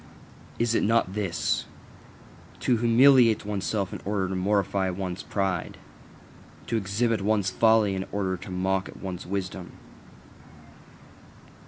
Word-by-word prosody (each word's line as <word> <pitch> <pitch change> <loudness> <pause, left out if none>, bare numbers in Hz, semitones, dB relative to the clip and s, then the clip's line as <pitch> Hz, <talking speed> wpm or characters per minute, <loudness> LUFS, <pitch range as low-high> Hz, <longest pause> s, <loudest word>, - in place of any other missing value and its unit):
Is 115 -1 +1
it - - +2
not 110 -4 +2
this: 100 -5 -1 1.0
To 125 - +2
humiliate 120 -1 +5
oneself 100 -1 -2
in - - -7
order 95 -2 -1
to 95 - -3
mortify 95 0 0
one's 95 0 -4
pride? 95 -4 -2 0.9
To - - -2
exhibit 110 +2 0
one's 100 -2 +1
folly 110 0 +3
in 95 0 -4
order 95 -2 -1
to 95 +2 -10
mock 95 +1 -1
at - - -12
one's 90 -2 -6
wisdom? 95 -1 -5
100 Hz, 125 wpm, -26 LUFS, 95-110 Hz, 1.0 s, humiliate